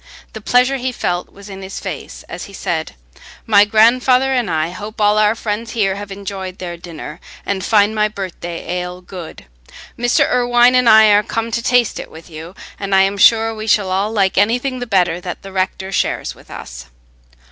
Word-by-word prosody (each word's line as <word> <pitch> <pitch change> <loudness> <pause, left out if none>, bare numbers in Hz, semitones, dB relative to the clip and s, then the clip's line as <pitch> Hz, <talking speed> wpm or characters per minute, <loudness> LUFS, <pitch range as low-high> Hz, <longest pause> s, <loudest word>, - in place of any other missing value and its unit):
The 220 - -8
pleasure 250 +5 +2
he 255 0 -2
felt 180 -7 -3
was 200 0 -14
in 195 -1 -9
his 190 +1 -7
face - - -7
as - - -7
he 200 - -13
said, 160 - -3 0.5
"My 205 -2 +5
grandfather 250 +5 +4
and 245 -6 0
I 160 0 -1
hope 210 +4 -8
all 210 0 +3
our 215 +1 +3
friends 225 +1 -4
here 200 -5 +1
have 200 0 -8
enjoyed 195 -1 -6
their 175 -2 -6
dinner, 170 -2 -9 0.3
and 195 -2 -2
find 210 -1 +3
my 215 -1 +2
birthday 185 -4 -7
ale 180 0 -6
good. 180 - -10 0.5
Mr. 245 0 +3
Irwine 245 0 +4
and 250 -2 +4
I 220 -1 +7
are 205 0 +5
come 225 +2 -3
to 235 - -1
taste 245 -1 +2
it - - -8
with 160 +2 -14
you, 160 +4 -9 0.2
and 195 -1 -1
I 190 - +6
am 195 +1 0
sure 225 +2 +5
we 215 0 -7
shall 205 -3 +2
all 195 +3 0
like 195 -4 +2
anything 245 +5 +1
the 245 - -5
better 180 -4 +1
that 175 -1 -7
the 195 - -9
rector 190 0 -2
shares - - -1
with - - -20
us." - - -9
205 Hz, 200 wpm, -17 LUFS, 185-225 Hz, 0.5 s, I